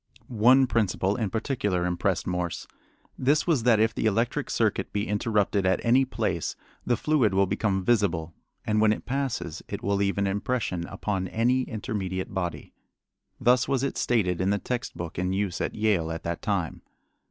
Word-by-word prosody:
One 125 +3 +5
principle 100 -4 0
in 110 -5 -1
particular 105 -5 -1
impressed 90 +1 0
Morse. 90 -1 -3 0.5
This 145 +4 +2
was 160 -8 +2
that 115 -2 +4
"if 110 0 +3
the 110 - 0
electric 115 +3 0
circuit - - 0
be 105 0 -2
interrupted 105 -1 +1
at 95 0 +2
any 130 +3 +4
place - - -2 0.3
the 120 - +1
fluid 130 -11 +2
will 100 0 +4
become 95 -1 -1
visible, 90 -8 +1 0.3
and 105 0 +2
when 110 -1 +5
it - - -7
passes 130 - -3
it - - -6
will 100 0 +1
leave 100 0 0
an 100 - +1
impression 100 -3 -1
upon 95 -3 -3
any 120 +6 +1
intermediate 100 -4 -4
body." 90 -3 -4 0.7
Thus 125 0 +3
was 135 -1 0
it 140 - -1
stated 90 -7 +1
in 95 - +1
the 100 - +2
text 125 +4 -4
book 85 0 -5
in 90 +1 0
use 95 -2 -1
at - - -2
Yale 105 -7 +1
at 80 - -5
that 85 0 -3
time. - - -2
105 Hz, 175 wpm, -26 LUFS, 95-120 Hz, 0.7 s, One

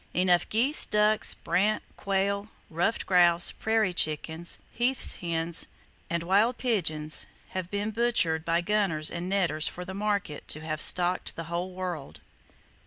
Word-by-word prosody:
Enough 180 -1 +2
geese, 255 +8 +2
ducks, 210 0 +2
brant, 210 +3 0
quail, 200 +1 -1 0.2
ruffed 175 +8 -1
grouse, 175 -2 +4
prairie 220 -4 0
chickens, 160 +1 0
heath 250 +2 -1
hens 165 -1 0 0.4
and 170 0 -2
wild 205 +7 +2
pigeons 155 -11 0 0.2
have 185 -2 -5
been 205 +2 -2
butchered 210 -9 +2
by 170 +1 +1
gunners 180 -6 0
and 175 +1 -5
netters 175 -6 +1
for 180 - -6
"the 190 - -7
market" 200 -6 -3
to 155 - -4
have 155 -1 -4
stocked 180 0 +3
the 165 - -5
whole 180 +2 -2
world. 180 -6 -6
180 Hz, 140 wpm, -27 LUFS, 165-210 Hz, 0.4 s, grouse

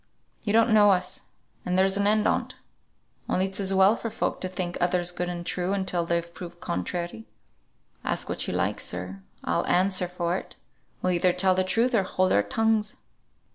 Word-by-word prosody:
You 205 - -1
don't 230 +2 +4
know 210 -1 +7
us, 185 -2 0 0.4
and 180 0 -1
there's 190 +1 +4
an 200 0 +2
end 215 0 +3
on't; - - -1 0.7
only 185 - +2
it's 195 +1 -3
as 195 -1 +1
well 195 +3 +5
for 230 - -4
folk 220 - -2
to 185 - +1
think 180 -1 -4
others 175 0 +1
good 175 0 -3
and 175 -1 -5
true 180 +2 -1
until 180 -3 -1
they're 170 0 +1
proved 175 0 -10
contrary. 170 - -4 0.8
Ask - - -2
what - - -2
you - - -2
like, - - 0
sir, 90 +2 -3 0.2
I'll - - 0
answer 185 0 +3
for 175 0 -1
it - - -9 0.5
we'll 185 - +2
either 175 +1 +2
tell 185 +1 +3
truth 230 +7 +1
or 220 - +4
hold 185 0 +1
our 100 - +5
tongues." 220 - 0
185 Hz, 185 wpm, -26 LUFS, 175-200 Hz, 0.8 s, know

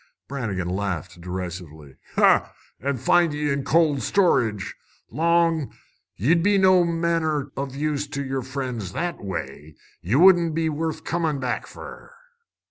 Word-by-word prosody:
Brannigan 105 -10 -3
laughed 90 -3 -3
derisively. 85 -5 -7 0.2
"An' 140 0 +1
find 165 +6 +3
ye 150 0 -1
in 140 0 -1
cold 155 -4 +2
storage, 125 - +1 0.4
Long! 165 +1 +1 0.4
Ye'd 160 - +2
be 205 +3 +3
no 185 -2 +5
manner 165 -4 0
o' 140 +1 -2
use 145 +2 -2
to 140 0 -4
yer 135 0 -2
friends 125 -7 -5
that 175 -6 -3
way. 80 -5 -6 0.3
Ye 100 +8 -1
wouldn't 170 -1 +5
be 160 -1 +1
worth 155 +1 -3
comin' 160 -4 -1
back 125 -2 -3
fer." - - -11
140 Hz, 130 wpm, -24 LUFS, 105-165 Hz, 0.4 s, no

